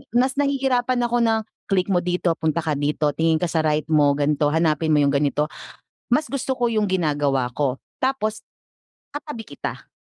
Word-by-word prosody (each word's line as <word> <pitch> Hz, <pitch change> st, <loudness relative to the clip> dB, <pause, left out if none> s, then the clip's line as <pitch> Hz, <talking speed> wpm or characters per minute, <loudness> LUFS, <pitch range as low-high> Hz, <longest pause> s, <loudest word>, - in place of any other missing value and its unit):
Mas 260 Hz, +3 st, +2 dB
nahihirapan 260 Hz, -3 st, +1 dB
ako 240 Hz, 0 st, +1 dB
na, 225 Hz, -1 st, +2 dB, 0.2 s
"Click 195 Hz, -1 st, +1 dB
mo 180 Hz, -, +3 dB
dito, 180 Hz, 0 st, 0 dB
punta 160 Hz, +1 st, 0 dB
ka 155 Hz, -3 st, -1 dB
dito, 150 Hz, 0 st, +1 dB
tingin 160 Hz, +2 st, +1 dB
ka 175 Hz, -1 st, -1 dB
sa 160 Hz, -, +1 dB
right 155 Hz, 0 st, 0 dB
mo, 145 Hz, -2 st, +4 dB
ganito, 145 Hz, +1 st, +1 dB
hanapin 160 Hz, 0 st, +1 dB
mo 145 Hz, -, +4 dB
yung 140 Hz, -, +3 dB
ganito." 145 Hz, +1 st, 0 dB, 0.6 s
Mas 295 Hz, +5 st, +1 dB
gusto 270 Hz, -1 st, -1 dB
ko 240 Hz, -2 st, 0 dB
yung 215 Hz, -2 st, +1 dB
ginagawa 145 Hz, -8 st, 0 dB
ko, 135 Hz, 0 st, -2 dB, 0.2 s
tapos 240 Hz, -5 st, -1 dB, 0.7 s
katabi 290 Hz, -7 st, -6 dB
kita. 140 Hz, -, -7 dB
170 Hz, 175 wpm, -22 LUFS, 150-240 Hz, 0.7 s, mo